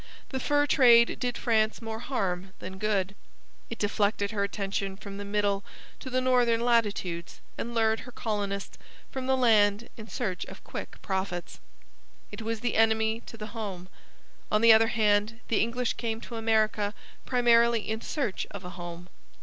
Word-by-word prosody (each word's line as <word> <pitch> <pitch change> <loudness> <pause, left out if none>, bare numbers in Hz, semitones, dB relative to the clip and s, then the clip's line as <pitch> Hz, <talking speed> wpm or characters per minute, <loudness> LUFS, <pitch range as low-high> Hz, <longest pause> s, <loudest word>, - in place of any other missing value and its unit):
The 265 - -3
fur 290 +2 +2
trade 240 -5 +5
did 245 -1 -1
France 220 -2 +1
more 225 -1 -5
harm 190 -7 -2
than 190 +1 -8
good. 200 -2 0 0.6
It 230 - -5
deflected 205 0 0
her 205 -2 0
attention 195 -1 -3
from 200 -1 -8
the - - -4
middle 200 -1 0 0.4
to 260 - -7
the 255 0 +1
northern 245 -3 +3
latitudes 205 -8 0 0.2
and 235 +1 -5
lured 220 -1 +2
her 250 - -10
colonists 205 -4 -3 0.3
from 260 -1 -4
the 265 0 +3
land 215 -3 +3
in 220 -1 -9
search 195 -8 -3
of - - -11
quick - - -7
profits. 190 -2 -3 0.7
It - - -7
was 225 0 -3
the 240 -2 0
enemy 220 0 +3
to 230 - -9
the 215 0 -8
home. 195 -5 -5 0.6
On 215 - +3
the 230 -1 +9
other 225 +1 +5
hand, 215 0 +2
the 225 - +2
English 235 +2 0
came 225 -2 -3
to 235 - -8
America 215 -2 +1 0.3
primarily 235 -2 +4
in 220 +1 -2
search 245 -9 -2
of 200 -2 -8
a 180 - -6
home. 175 0 -8
220 Hz, 165 wpm, -28 LUFS, 200-235 Hz, 0.7 s, the